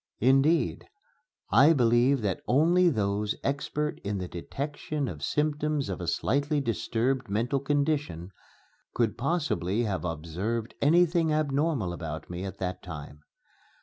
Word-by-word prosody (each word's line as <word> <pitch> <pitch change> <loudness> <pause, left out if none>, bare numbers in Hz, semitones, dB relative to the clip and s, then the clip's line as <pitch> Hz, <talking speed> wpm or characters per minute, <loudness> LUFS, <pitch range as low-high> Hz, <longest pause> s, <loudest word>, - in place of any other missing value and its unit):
Indeed, 135 +7 +3 0.6
I 150 +5 +7
believe 120 0 +3
that 100 -3 -1
only 175 +7 +4
those 105 -4 0
expert 150 +2 -2
in 100 0 -2
the 90 -1 -4
detection 145 - -4
of 75 -9 -6
symptoms 150 - 0
of 95 -1 -4
a 85 - -4
slightly 145 - +1
disturbed 125 0 -1
mental 120 +7 0
condition 140 - -1 0.6
could 115 -3 +1
possibly 120 - 0
have 100 -5 -2
observed 90 - -3
anything 165 +1 +4
abnormal 145 - 0
about 80 -1 -6
me 90 +1 -5
at 95 - -6
that 90 -1 -4
time. 75 -1 -9
125 Hz, 125 wpm, -28 LUFS, 95-150 Hz, 0.6 s, I